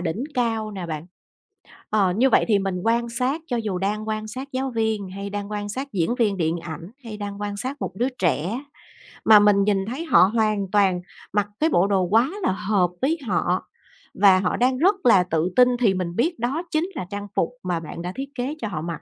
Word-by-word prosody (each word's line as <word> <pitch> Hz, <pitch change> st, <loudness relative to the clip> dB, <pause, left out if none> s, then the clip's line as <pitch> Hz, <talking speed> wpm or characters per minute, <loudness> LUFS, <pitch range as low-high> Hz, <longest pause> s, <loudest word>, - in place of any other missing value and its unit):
đỉnh 180 Hz, +9 st, -2 dB
cao 225 Hz, -3 st, 0 dB
nè 190 Hz, -4 st, -6 dB
bạn. 155 Hz, +1 st, -5 dB, 0.8 s
Ờ, 200 Hz, -4 st, +3 dB
như 260 Hz, +3 st, +4 dB
vậy -, -, +4 dB
thì 205 Hz, -2 st, +4 dB
mình 195 Hz, -1 st, -2 dB
quan 235 Hz, +1 st, +1 dB
sát 255 Hz, +6 st, -1 dB
cho 245 Hz, -, -1 dB
dù 210 Hz, -5 st, -2 dB
đang 210 Hz, +3 st, -2 dB
quan 215 Hz, 0 st, -2 dB
sát 260 Hz, +4 st, -6 dB
giáo 260 Hz, +1 st, -2 dB
viên, 220 Hz, -4 st, -1 dB
hay 200 Hz, +1 st, -6 dB
đang 205 Hz, 0 st, -5 dB
quan 205 Hz, -1 st, -3 dB
sát 265 Hz, +6 st, -4 dB
diễn 190 Hz, +5 st, 0 dB
viên 210 Hz, -4 st, +2 dB
điện 165 Hz, 0 st, 0 dB
ảnh, 165 Hz, +3 st, -8 dB
hay 215 Hz, -2 st, -7 dB
đang 205 Hz, 0 st, -6 dB
quan 205 Hz, 0 st, -3 dB
sát 260 Hz, +7 st, -4 dB
một -, -, -3 dB
đứa 245 Hz, +4 st, +1 dB
trẻ 180 Hz, -, 0 dB, 0.7 s
mà 215 Hz, -1 st, +9 dB
mình 205 Hz, -1 st, +4 dB
nhìn 195 Hz, -2 st, +1 dB
thấy 280 Hz, +8 st, -4 dB
họ 175 Hz, -, +6 dB
hoàn 210 Hz, -3 st, +1 dB
toàn 195 Hz, -4 st, +3 dB, 0.3 s
mặc 205 Hz, -1 st, +1 dB
cái 320 Hz, +2 st, +3 dB
bộ 185 Hz, -, +3 dB
đồ 195 Hz, -2 st, +2 dB
quá 225 Hz, -, +3 dB
là -, -, +2 dB
hợp 200 Hz, -3 st, +1 dB
với 315 Hz, +5 st, +1 dB
họ, 180 Hz, -1 st, 0 dB, 0.5 s
và 190 Hz, -1 st, +6 dB
họ 180 Hz, -, 0 dB
đang 255 Hz, +1 st, +2 dB
rất 375 Hz, +7 st, +4 dB
là 195 Hz, -6 st, +6 dB
tự 165 Hz, 0 st, 0 dB
tin 250 Hz, -1 st, +5 dB
thì 210 Hz, -6 st, +3 dB
mình 180 Hz, -2 st, -3 dB
biết 325 Hz, +4 st, 0 dB
đó 270 Hz, +8 st, -1 dB
chính 320 Hz, +4 st, 0 dB
là 185 Hz, -, -4 dB
trang 205 Hz, 0 st, -5 dB
phục -, -, +1 dB
mà 175 Hz, -2 st, -1 dB
bạn 165 Hz, +1 st, -8 dB
đã 180 Hz, +1 st, -4 dB
thiết 270 Hz, +1 st, -5 dB
kế 265 Hz, +4 st, -3 dB
cho 220 Hz, -, -2 dB
họ 160 Hz, -6 st, -4 dB
mặc, 165 Hz, -1 st, -5 dB
205 Hz, 225 wpm, -23 LUFS, 185-245 Hz, 0.8 s, mà